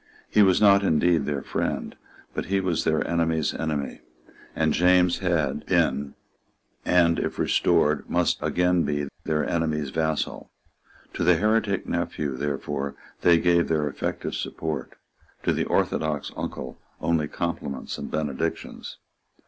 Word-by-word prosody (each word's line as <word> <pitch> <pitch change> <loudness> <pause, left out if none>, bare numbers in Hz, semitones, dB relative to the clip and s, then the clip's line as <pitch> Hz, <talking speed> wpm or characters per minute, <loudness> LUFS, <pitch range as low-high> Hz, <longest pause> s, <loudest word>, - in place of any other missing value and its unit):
He 105 - +5
was 95 -2 +5
not 100 -2 +6
indeed 80 -4 +2
their 70 -2 -2
friend; - - -3 0.4
but - - -3
he 95 +1 +1
was 90 -4 -1
their 80 -1 +1
enemy's 80 -3 +1
enemy; 75 -3 -3 0.5
and 80 -1 +2
James 90 0 +4
had 80 -6 0
been, 70 +1 +1 0.7
and, 85 -2 +3
if - - -3
restored, 75 0 +2
must - - +1
again 90 0 +2
be, 75 -3 -1 0.2
their 75 -1 0
enemy's 75 -4 -1
vassal. 80 0 -2 0.6
To - - -2
the 90 +1 +5
heretic 105 +1 +1
nephew 70 -3 -2
therefore 70 0 -3 0.3
they 85 -1 +6
gave 85 0 +3
their 75 -2 +1
effective 70 - -3
support, 80 -3 -4 0.5
to - - +2
the - - 0
orthodox 75 -2 0
uncle 65 - -6 0.2
only 80 -3 +1
compliments 85 -5 -4
and - - -5
benedictions. 75 +1 -3
80 Hz, 130 wpm, -25 LUFS, 75-90 Hz, 0.7 s, not